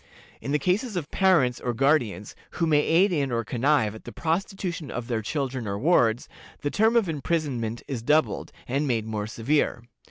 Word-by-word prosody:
In 140 - -4
the 150 - +3
cases 195 - 0
of 165 -5 -4
parents 170 -11 +3
or 120 -1 -3
guardians 125 -6 +1 0.2
who 170 - 0
may 155 -2 +4
aid 180 +6 +3
in 140 -6 0
or 115 -1 -1
connive 125 -1 +1
at 110 - -11
the - - -8
prostitution 170 -2 -3
of 125 -1 -4
their 115 -3 -1
children 130 -1 -3
or 100 0 -2
wards, 120 -4 +2 0.3
the 145 - -2
term 220 +3 +3
of 230 -5 +3
imprisonment 140 -7 -2
is 130 -5 -4
doubled, 150 +6 +1 0.2
and 140 +4 0
made 115 -4 0
more 105 -1 -3
severe. 120 +2 0
140 Hz, 185 wpm, -26 LUFS, 115-165 Hz, 0.3 s, may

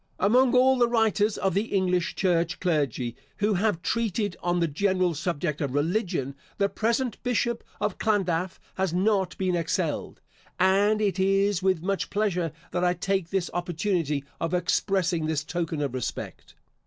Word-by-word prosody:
Among 250 +5 +4
all 260 +1 +5
the 240 - +5
writers 225 -2 +2
of 195 - 0
the 200 +4 +1
English 180 -4 0
church 175 -2 +1
clergy, 140 - 0 0.2
who 210 +1 +1
have 190 -3 0
treated 215 -4 -1
on 175 0 0
the 170 - +2
general 185 +2 +1
subject 155 -1 -2
of 140 -2 -2
religion, 160 - 0 0.2
the 200 -1 +2
present 235 +3 -1
Bishop 240 -1 0 0.2
of 210 -2 -1
Llandaff 185 -4 0 0.2
has 190 -3 0
not 195 0 +1
been 185 -2 0
excelled, 165 -1 -2 0.4
and 200 +3 +3
it 195 -2 0
is 195 0 +2
with 185 -3 +1
much 195 +1 -1
pleasure 180 -6 0 0.2
that 180 - -1
I 180 0 +2
take 190 -1 -1
this 190 -2 -1
opportunity 175 -4 -1 0.2
of 165 +2 -1
expressing 175 -2 +1
this 155 -2 -1
token 165 -2 -2
of 140 -3 -2
respect. 130 -2 -5
185 Hz, 155 wpm, -26 LUFS, 170-205 Hz, 0.4 s, all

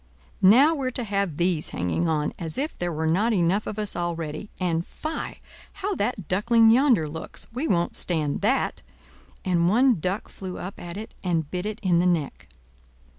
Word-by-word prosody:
now 260 +12 +7
we're 270 -5 -1
to 250 0 -4
have 200 -7 -1
these 175 -3 +1
hanging 90 - -1
on, 150 -2 0
as 165 -3 -3
if 295 +4 -2
there 175 0 -1
were 160 0 -2
not 200 +9 +2
enough 185 +2 +1
of 210 - -4
us 210 -1 -1
already! 170 +1 -3
And—fie!—how 310 - -4
that 205 - -2
Duckling 225 +4 +4
yonder 240 - +4
looks; 160 +2 -6
we 265 +7 -2
won't 175 -2 +1
stand 155 -5 0
that!" - - +1 0.6
And 175 -2 +2
one 245 0 +4
duck 185 +5 -2
flew 185 -2 -7
up 190 +2 -7
at 175 +1 -7
it, 220 +1 -7
and 165 -5 -1
bit 180 +2 -2
it 215 0 -5
in 175 -3 +3
the 180 - +3
neck. 165 -5 -1
185 Hz, 175 wpm, -25 LUFS, 170-220 Hz, 0.6 s, now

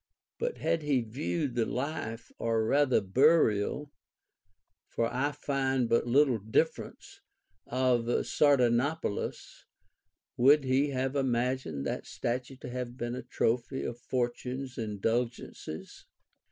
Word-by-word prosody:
But 480 0 -2
had 165 - 0
he 145 -4 +1
viewed 135 +5 -2
the 120 - +1
life 125 -4 -4
or 115 -1 +1
rather 135 -1 +3
burial 135 - +3 1.0
(for 115 - -1
I 135 +4 +1
find 135 -3 0
but 115 +1 +2
little 130 -1 +4
difference) 110 +10 -2 0.5
of 125 -2 +2 0.2
Sardanapalus, 140 -1 +1 0.7
would 140 +4 +6
he 135 +2 +2
have 135 0 -1
imagined 125 - -1
that - - -3
statue 125 +2 -3
to - - -6
have 125 0 -5
been 120 -1 -3
a 130 - -4
trophy 125 +1 -1
of 120 0 -5
Fortune's 125 +1 -3
indulgences 115 -5 -3
125 Hz, 115 wpm, -30 LUFS, 120-140 Hz, 1.0 s, would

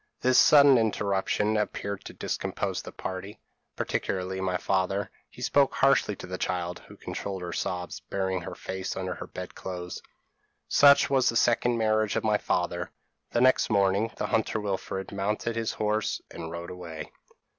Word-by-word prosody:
This 130 0 +5
sudden 140 -4 +7
interruption 105 -1 +1
appeared 100 -1 -3
to - - -8
discompose - - -2
the - - -9
party, 95 +3 -6 0.4
particularly 95 0 -2
my 90 -1 0
father; 95 +2 0 0.2
he - - -10
spoke 140 -1 +3
harshly 135 -6 +3
to - - -9
the 95 0 -6
child, 90 -1 -2
who - - -13
controlled 95 -2 -5
her 85 -1 -4
sobs, 90 0 -3
burying 95 -1 -2
her - - -7
face 95 0 -5
under 95 -1 -2
the - - -5
bed - - -7
clothes. 90 -1 -6 0.7
"Such 140 0 +6
was 135 -2 +4
the 115 - -2
second 120 +1 +3
marriage 110 -1 +1
of - - 0
my 105 -1 +2
father. - - -1 0.4
The 120 - +1
next 130 0 +4
morning, 100 +1 +2
the - - -1
hunter 110 -1 0
Wilfred 95 -1 -3
mounted 105 +3 -2
his 115 -1 -1
horse, 105 0 0
and 80 -1 -6
rode 85 +1 -6
away. 85 -3 -8
100 Hz, 165 wpm, -28 LUFS, 95-115 Hz, 0.7 s, sudden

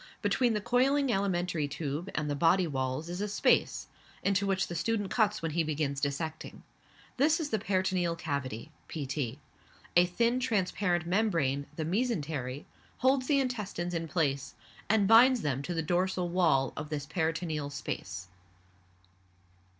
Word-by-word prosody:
Between 240 -3 +2
the 210 - -1
coiling 265 +4 +2
alimentary 180 -6 0
tube 150 +4 -4
and 155 -1 -1
the 145 - -1
body 170 +5 +4
walls 135 0 -2
is 175 +3 -4
a 210 - -1
space, 205 - +2 0.4
into 200 0 +1
which 195 -1 +1
the - - -7
student 205 +3 -1
cuts 210 -4 +1
when 165 - -1
he 170 +2 +1
begins 145 -2 -2
dissecting; 155 +2 -4 0.5
this 300 +5 +3
is 300 -3 -3
the 220 - +1
peritoneal 185 -4 0
cavity 140 -4 -4 0.2
(pt.). 135 -4 -3 0.6
A 175 +1 +6
thin, 235 +7 +1
transparent 195 -6 0
membrane, 165 -8 +1
the 160 - -3
mesentery, 155 - -2 0.3
holds 260 0 +2
the 285 -2 +3
intestines 210 -9 -2
in 165 -1 -2
place, 140 -4 -1 0.3
and 210 -2 +4
binds 235 +2 +6
them 135 -2 -1
to 175 +5 -4
the 165 - 0
dorsal 180 +2 0
wall 160 -7 +2
of 150 -1 -5
this 145 -2 -3
peritoneal 160 -2 -2
space. 140 - -5
175 Hz, 150 wpm, -30 LUFS, 150-210 Hz, 0.6 s, A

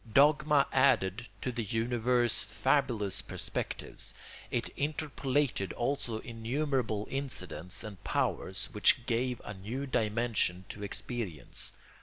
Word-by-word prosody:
Dogma 150 +1 +6
added 120 -5 +3
to 125 - -1
the 120 -1 -2
universe 120 +2 +1
fabulous 120 -9 +1
perspectives; - - -3 0.3
it - - 0
interpolated 145 - 0
also 120 -2 -1
innumerable 115 -2 -1
incidents 95 - -4
and 100 -4 -8
powers 95 +8 0
which 115 +1 +4
gave 120 +1 0
a - - -4
new 110 +8 -4
dimension 110 -6 +1
to 105 - -7
experience. 100 - -3
120 Hz, 105 wpm, -32 LUFS, 105-135 Hz, 0.3 s, Dogma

